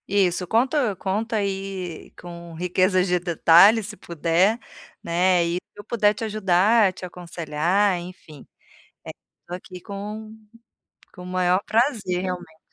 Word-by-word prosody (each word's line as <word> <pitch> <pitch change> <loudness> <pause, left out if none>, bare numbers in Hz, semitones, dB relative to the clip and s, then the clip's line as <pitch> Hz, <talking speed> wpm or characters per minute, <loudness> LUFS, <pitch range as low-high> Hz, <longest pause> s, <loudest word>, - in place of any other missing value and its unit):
Isso, 185 -2 +1
conta 245 - +1
conta 215 +5 -2
aí 195 -4 -4
com 170 -1 -10
riquezas 185 +2 +1
de 180 0 +1
detalhes, 180 +5 +5
se 210 - -8
puder, 170 +7 +1 0.4
né, 175 +1 +2
e 170 - -1
se 180 - -3 0.2
eu - - -8
puder 210 -1 +2
te 215 - -7
ajudar, 210 0 +3
te 185 - -9
aconselhar, 175 +2 -1
enfim, 175 -5 -12 0.6
eh, - - -8 0.4
tô 175 - -6
aqui 180 0 -9
com 210 +2 -7 0.8
com 180 - -11
o - - -9
maior 180 0 +1
prazer, 215 -6 0
realmente. 180 -4 -6
185 Hz, 135 wpm, -23 LUFS, 175-205 Hz, 0.8 s, detalhes